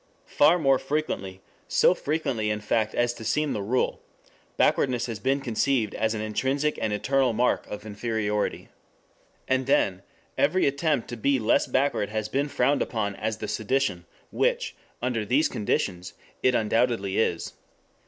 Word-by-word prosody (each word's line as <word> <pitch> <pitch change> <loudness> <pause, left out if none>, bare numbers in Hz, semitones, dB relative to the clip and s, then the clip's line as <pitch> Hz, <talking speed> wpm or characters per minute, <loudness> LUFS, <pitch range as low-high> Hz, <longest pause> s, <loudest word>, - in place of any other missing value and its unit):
Far 155 +4 +4
more 135 -5 +3
frequently, 135 -10 -3 0.3
so - - +4
frequently 140 -8 -1
in 105 0 -1
fact 110 +1 0
as 120 0 +1
to 115 - -10
seem 150 +5 0
the 105 - -2
rule, 120 +6 0 0.6
backwardness 125 -3 +2
has 115 -4 -5
been 135 +4 0
conceived 120 -2 0
as 110 0 0
an 105 - -3
intrinsic 135 +7 -1
and 110 - 0
eternal 130 +4 +1
mark 120 +3 +1
of 105 - -7
inferiority. 105 -1 -2 0.8
And 130 0 +1
then 95 -8 +2 0.4
every 180 +6 +3
attempt 140 -2 0
to 120 - -5
be 140 +5 +2
less 115 -2 +2
backward 130 -6 +1
has 110 0 -3
been 140 +2 0
frowned 140 0 +1
upon 105 -4 -2
as 110 +2 -3
the 110 - -5
sedition, 110 - -1 0.2
which, - - 0 0.3
under 120 -3 0
these 130 +9 +2
conditions, 90 -3 -2 0.3
it 130 -1 +3
undoubtedly 110 -3 +1
is. 85 -6 -1
120 Hz, 155 wpm, -26 LUFS, 105-135 Hz, 0.8 s, Far